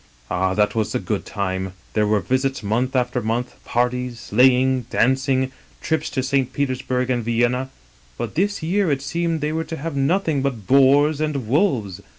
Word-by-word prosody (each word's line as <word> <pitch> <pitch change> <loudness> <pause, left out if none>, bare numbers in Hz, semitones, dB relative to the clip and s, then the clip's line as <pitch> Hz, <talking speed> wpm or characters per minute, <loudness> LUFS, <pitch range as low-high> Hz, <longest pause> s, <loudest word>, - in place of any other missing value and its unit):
Ah, 95 +1 0
that 105 -1 +2
was 110 -2 -1
the - - 0
good - - -3
time 95 -1 -2
I - - -9 0.2
There 105 -1 +2
were 105 -1 +2
visits 130 +6 -1
month 120 +6 0
after 125 -1 0
month; 120 +3 -3
parties, 125 0 -1
sleigh 125 +3 +4
ing, 130 -2 0
dancing, 130 +1 +1 0.3
trips 160 -1 -1
to 130 - -2
St. 135 -1 0
Petersburg 130 -2 -1
and 120 -2 0
Vienna. 120 +3 0 0.5
But - - -4
this 200 +1 0
year 185 +3 +1
it 140 -2 0
seemed 165 +1 -1
they 150 +1 -1
were 160 0 -1
to 165 - -6
have 160 0 -5
nothing 150 +1 +1
but 125 -7 -3
boars 140 +4 +4
an(t 150 -2 0
wolves. 115 - 0
130 Hz, 180 wpm, -22 LUFS, 120-140 Hz, 0.5 s, sleigh